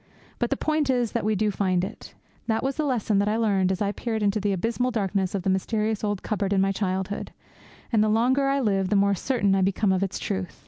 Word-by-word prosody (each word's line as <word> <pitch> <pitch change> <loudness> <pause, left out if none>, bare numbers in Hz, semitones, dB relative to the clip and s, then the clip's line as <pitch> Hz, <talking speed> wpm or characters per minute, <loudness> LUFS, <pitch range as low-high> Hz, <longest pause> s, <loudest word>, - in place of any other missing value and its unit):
But - - 0
the - - 0
point 310 -2 0
is 245 -3 +1
that 235 - -1
we 215 +1 +1
do 210 +1 +1
find 185 -2 0
it. 190 - -8 0.3
That 220 -1 0
was 270 0 -1
the 310 - -1
lesson 225 -6 +1
that 200 - +1
I 215 +1 +1
learned 195 -5 +2
as 190 +2 -1
I 200 - 0
peered 220 0 -3
into 205 +1 +1
the 205 0 0
abysmal 230 +6 0
darkness 195 -4 -1
of 190 - -2
the 195 - 0
mysterious 215 +3 -1
old 205 -2 -2
cupboard 205 -2 -1
in 195 - +2
my 195 0 +2
childhood, 190 0 -3 0.6
and 215 -2 +4
the 215 - +2
longer 255 +5 +2
I 275 0 +1
live 195 -5 +1
the 205 - +2
more 200 0 +3
certain 205 0 +1
I 195 - +2
become 195 +2 +1
of 185 - 0
its 195 -1 -2
truth. 190 -3 -4
205 Hz, 245 wpm, -25 LUFS, 195-225 Hz, 0.6 s, and